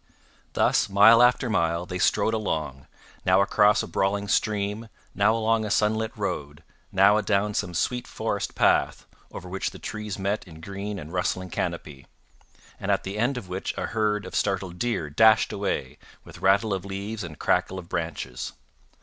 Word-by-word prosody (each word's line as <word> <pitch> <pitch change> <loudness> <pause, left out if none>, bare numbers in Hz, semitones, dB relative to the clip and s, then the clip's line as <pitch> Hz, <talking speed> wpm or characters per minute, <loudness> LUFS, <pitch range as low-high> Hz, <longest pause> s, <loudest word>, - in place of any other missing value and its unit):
Thus, - - +2
mile 105 +4 +7
after 125 +1 +4
mile, 85 -5 0
they 90 0 -5
strode 105 +4 +2
along, 75 - -3 0.4
now 95 +1 +4
across 105 +1 +3
a - - -6
brawling 100 +1 -1
stream, 105 +1 -1 0.2
now 105 +3 +3
along 115 0 +1
a 105 - -3
sunlit 110 +2 +1
road, 75 -8 -4 0.3
now 100 +2 +5
adown 105 0 0
some 90 -4 -2
sweet 125 +8 -1
forest - - -3
path, - - +2 0.3
over 90 - -8
which 95 +2 -3
the - - -12
trees 105 -2 -5
met 100 +2 -2
in 80 -2 -12
green 100 +4 -6
and 75 0 -9
rustling 90 0 -2
canopy, 80 -5 -4 0.7
and - - -5
at - - +1
the 100 +2 -5
end 125 +4 +1
of 105 - -7
which 90 +1 -4
a - - -2
herd 105 -2 -1
of - - -9
startled 95 -3 -1
deer 115 -10 -1
dashed 110 +9 +4
away, 75 -8 -3 0.2
with - - -13
rattle 100 +2 +3
of 95 -2 -3
leaves 100 +2 -5
and 75 -3 -8
crackle 95 - 0
of 90 -2 -8
branches. 80 -8 -4
100 Hz, 170 wpm, -25 LUFS, 90-105 Hz, 0.7 s, mile